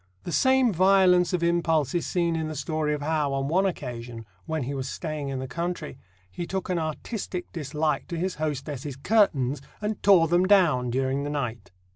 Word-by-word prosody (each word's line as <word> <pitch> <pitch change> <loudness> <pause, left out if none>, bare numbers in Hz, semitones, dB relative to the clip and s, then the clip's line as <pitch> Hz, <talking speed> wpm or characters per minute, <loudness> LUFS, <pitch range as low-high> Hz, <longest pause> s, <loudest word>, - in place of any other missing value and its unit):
The 175 - -5
same 260 +1 +3
violence 185 0 +4
of 180 -2 0
impulse 165 -4 +1
is 175 - -1
seen 170 -2 0
in 160 -1 -2
the 155 - -5
story 150 +1 -1
of 145 - -6
how, 150 -2 0
on 135 0 -1
one 185 +6 +2
occasion, 120 -8 -6 0.2
when 160 -3 -1
he 135 +3 -4
was 135 -1 -4
staying 155 -4 -4
in 135 - -3
the 130 0 -4
country, 170 0 -4 0.3
he 175 - -5
took 190 -1 -3
an 180 -2 +1
artistic 175 +4 -4
dislike 150 -1 -2
to 170 - -4
his 180 0 -2
hostess's 145 -2 -3
curtains, 140 - +2 0.2
and 210 0 -3
tore 185 -4 +6
them 175 +3 +3
down 165 -11 +4
during 135 +3 0
the 145 - -3
night. 125 -7 -4
155 Hz, 190 wpm, -26 LUFS, 140-180 Hz, 0.3 s, tore